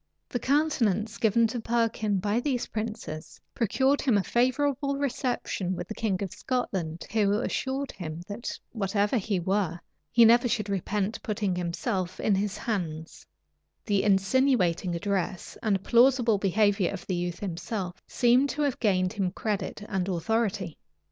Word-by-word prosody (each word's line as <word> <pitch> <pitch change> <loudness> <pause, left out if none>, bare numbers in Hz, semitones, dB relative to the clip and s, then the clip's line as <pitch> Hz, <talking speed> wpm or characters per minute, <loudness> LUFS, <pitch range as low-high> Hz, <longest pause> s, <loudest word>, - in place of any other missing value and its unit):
The 245 - -2
countenance 230 - +1
given 225 +1 +4
to 225 +2 -2
Perkin 225 -3 0
by 205 +4 0
these 250 -2 -1
princes 215 -8 -6
procured 265 +5 +2
him 250 -7 +3
a 200 - +1
favorable 275 +4 +1
reception 245 -9 -1
with - - -5
the - - -5
king 205 -4 -1
of 190 - -5
Scotland, 185 -10 -2
who 205 -3 +2
assured 265 +5 -1
him, 165 -2 -6
that, 210 +4 -5
whatever 205 +2 0
he 200 -1 -1
were, 180 -1 0 0.3
he 235 - +7
never 240 +2 +6
should 215 -4 -1
repent 200 +2 -1
putting 205 -3 -1
himself 180 +1 -2
in 210 - +2
his 195 +1 0
hands:[*] 165 -8 -4 0.6
the 205 -3 +2
insinuating 195 -3 +2
address 190 0 -2
and 200 -4 +1
plausible 240 -2 +4
behavior 200 -1 +2
of 195 -3 -7
the 185 - -2
youth 175 -1 -2
himself, 185 0 -4
seem 250 +2 +4
to 295 +2 -2
have 280 -3 0
gained 185 -4 +2
him 195 -4 0
credit 205 +1 -3
and 190 -1 -1
authority. 195 0 -1
210 Hz, 150 wpm, -27 LUFS, 185-235 Hz, 0.6 s, he